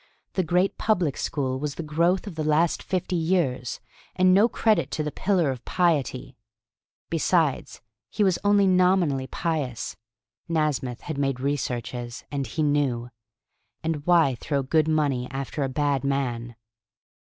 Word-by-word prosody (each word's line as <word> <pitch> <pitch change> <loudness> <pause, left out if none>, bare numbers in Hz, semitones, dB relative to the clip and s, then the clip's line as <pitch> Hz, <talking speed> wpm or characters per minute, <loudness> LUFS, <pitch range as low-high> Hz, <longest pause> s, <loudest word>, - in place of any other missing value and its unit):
The 190 - +1
great 180 +3 +1
public 180 -10 +1
school 130 -3 -2
was 150 0 -3
the 170 - -5
growth 170 +6 +1
of 200 - -6
the 160 -1 -3
last 155 +2 +2
fifty 185 -1 -2
years, 160 -8 0 0.4
and 185 0 +5
no 210 +5 +5
credit 220 -1 +2
to 155 - -2
the 150 - -3
pillar 180 -6 +1
of 125 -2 -7
piety. 140 -7 0 0.8
Besides, 165 -2 +1 0.3
he 210 - 0
was 190 -3 +2
only 205 -1 +4
nominally 180 -7 +3
pious. 145 -9 -3 0.5
Nasmyth 145 -6 -1
had 155 -4 -5
made 135 -2 0
researches, 125 -3 -3
and 140 -3 -2
he 155 +7 -2
knew. 135 -5 0 0.7
And 160 -3 -2
why 165 -6 +5
throw 140 -2 -1
good 155 +3 +2
money 145 -6 +1
after 135 +3 -4
a 135 - 0
bad 140 0 0
man? 120 -4 -2
150 Hz, 145 wpm, -25 LUFS, 135-175 Hz, 0.8 s, and